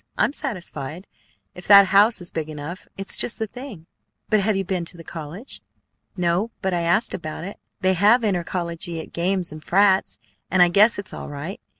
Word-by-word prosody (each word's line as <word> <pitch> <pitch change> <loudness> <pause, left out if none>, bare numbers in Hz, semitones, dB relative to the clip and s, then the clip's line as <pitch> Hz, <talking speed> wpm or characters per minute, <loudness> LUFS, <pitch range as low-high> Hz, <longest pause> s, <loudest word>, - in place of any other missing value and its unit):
I'm - - +2
satisfied. 185 - -5 0.5
If 180 - -11
that 200 0 +9
house 210 +1 +5
is 175 - +1
big 160 -1 -4
enough, 155 +4 -7
it's 195 0 -1
just 240 - 0
the 220 - -2
thing." 235 - -10 0.5
"But 215 - +5
have 205 0 +1
you 195 - 0
been 185 -2 -2
to 175 - -10
the 165 - -10
college?" 165 - -8 0.6
"No, 180 +5 +1
but 190 -1 0
I 175 - 0
asked 175 +7 +2
about 155 -2 -5
it. 195 +3 -8 0.2
They 185 0 +3
have 210 +7 +4
intercollegiate 170 -4 -3
games 180 +1 0
and 155 0 -10
frats, 195 0 +3 0.3
and 185 -1 +5
I 175 - +4
guess 205 +5 +5
it's 200 - -7
all - - -7
right. 150 +10 -7
185 Hz, 190 wpm, -23 LUFS, 170-205 Hz, 0.6 s, that